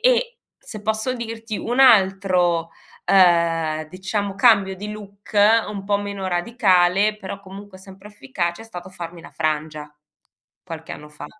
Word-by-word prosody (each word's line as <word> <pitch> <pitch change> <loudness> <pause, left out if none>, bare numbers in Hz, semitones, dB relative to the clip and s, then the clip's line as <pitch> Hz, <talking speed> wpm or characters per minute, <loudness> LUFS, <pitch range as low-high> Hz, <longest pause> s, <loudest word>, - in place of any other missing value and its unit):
e, - - +2 0.2
se 215 -3 -10
posso 220 +4 -1
dirti, 225 -2 -6
un 245 +3 -3
altro, 190 -7 +4 0.3
ehm, 165 -4 +3
diciamo 195 +3 -4
cambio 200 -3 +4
di 210 +2 -7
look 205 0 -11 0.3
un 200 -2 -6
po' 200 0 +1
meno 200 -2 -5
radicale 190 +1 +2
però 195 -1 -7
comunque 195 0 -12
sempre 190 +1 -14
efficace 205 -4 -4
è - - -13
stato 185 -5 -9
farmi 170 -2 -9
la - - -13
frangia, 155 -1 -3 0.7
qualche 165 -2 -8
anno 150 - -10
fa. 150 - -10
195 Hz, 140 wpm, -21 LUFS, 175-210 Hz, 0.7 s, altro